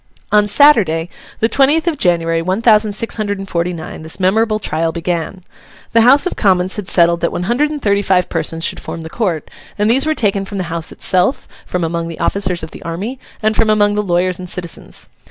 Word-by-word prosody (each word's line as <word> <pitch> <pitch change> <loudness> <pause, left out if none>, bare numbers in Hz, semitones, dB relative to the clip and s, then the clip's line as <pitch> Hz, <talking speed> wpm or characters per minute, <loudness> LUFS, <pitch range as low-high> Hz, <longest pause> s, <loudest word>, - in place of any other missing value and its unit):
On 210 0 +4
Saturday, 200 - +4 0.3
the 225 - +4
twentieth 285 +6 +2
of 325 -3 0
January, 165 -2 +1
one 185 +6 -2
thousand 215 -2 +4
six 230 +3 -2
hundred 205 -2 -2
and 195 0 -7
forty 170 0 -1
nine, 160 -2 -8
this 160 +4 -5
memorable 215 +4 +2
trial 165 -5 -2
began. 170 +2 -4 0.5
The 230 - +5
House 270 +8 +6
of 365 - -2
Commons 185 -2 +2
had 205 -3 -5
settled 170 -1 +3
that 170 - 0
one 175 - -3
hundred 245 +10 +1
and 300 -1 -5
thirty 200 -1 +2
five 185 -2 +2
persons 165 0 -3
should - - 0
form 165 - -7
the 160 0 -9
Court, 180 -9 -2 0.3
and 210 +2 +2
these 270 +5 +2
were 310 - +1
taken 200 -5 +1
from 200 +1 -7
the 185 - -1
House 170 0 -2
itself, 185 +8 +1 0.2
from 180 -1 -2
among 165 0 -2
the 165 - -8
officers 185 -4 0
of 160 - -7
the - - -11
army, 200 +10 -5 0.2
and 215 0 +2
from 220 - +2
among 205 -1 +3
the 210 - 0
lawyers 180 -2 0
and 180 -1 -8
citizens. 175 -2 -6
190 Hz, 220 wpm, -16 LUFS, 170-220 Hz, 0.5 s, House